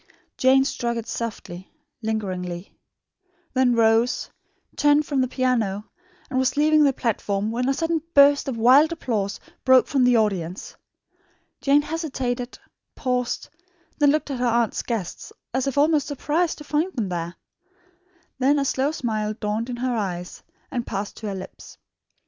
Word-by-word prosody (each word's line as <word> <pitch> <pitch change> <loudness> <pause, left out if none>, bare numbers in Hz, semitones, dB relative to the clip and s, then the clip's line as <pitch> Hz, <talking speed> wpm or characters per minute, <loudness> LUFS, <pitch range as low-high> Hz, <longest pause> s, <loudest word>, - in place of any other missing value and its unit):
Jane 265 +1 +4
struck 235 -3 -2
it 230 - -5
softly, 190 -5 -6 0.3
lingeringly; 185 -5 -4 0.8
then 255 -2 +3
rose, 230 +1 +2 0.4
turned 295 0 +4
from 280 -3 0
the 255 - +1
piano, 230 -6 0 0.4
and 260 -3 -1
was 260 +1 +1
leaving 305 +1 +5
the 280 - +5
platform, 215 -4 -1
when 250 +3 -1
a - - +3
sudden 325 0 0
burst 280 0 +6
of 255 -4 -3
wild 265 +8 +6
applause 215 -11 -2 0.2
broke 260 -1 +6
from 270 -3 +1
the 245 -1 +5
audience. 190 -5 -2 0.9
Jane 285 +1 +4
hesitated, 265 -6 -3 0.4
paused, 250 -2 -2 0.5
looked 295 0 +3
at 260 - -3
her 250 - +1
aunt's 235 -1 +1
guests 220 -8 -5 0.2
as 260 +1 0
if 275 - -2
almost 300 0 +3
surprised 310 +4 -1
to 300 - -10
find 305 +5 0
them 220 -7 -2
there. 175 0 -4 1.0
Then 270 +3 +4
the 280 -1 +1
slow 270 +1 +1
smile 215 -7 -2
dawned 215 +2 -3
in 245 - -3
her 250 0 -1
eyes 180 -5 -4 0.3
and 240 -1 -3
passed 200 +1 -4
to 220 - -6
her 200 - -3
lips. 190 - -10
250 Hz, 150 wpm, -23 LUFS, 215-280 Hz, 1.0 s, burst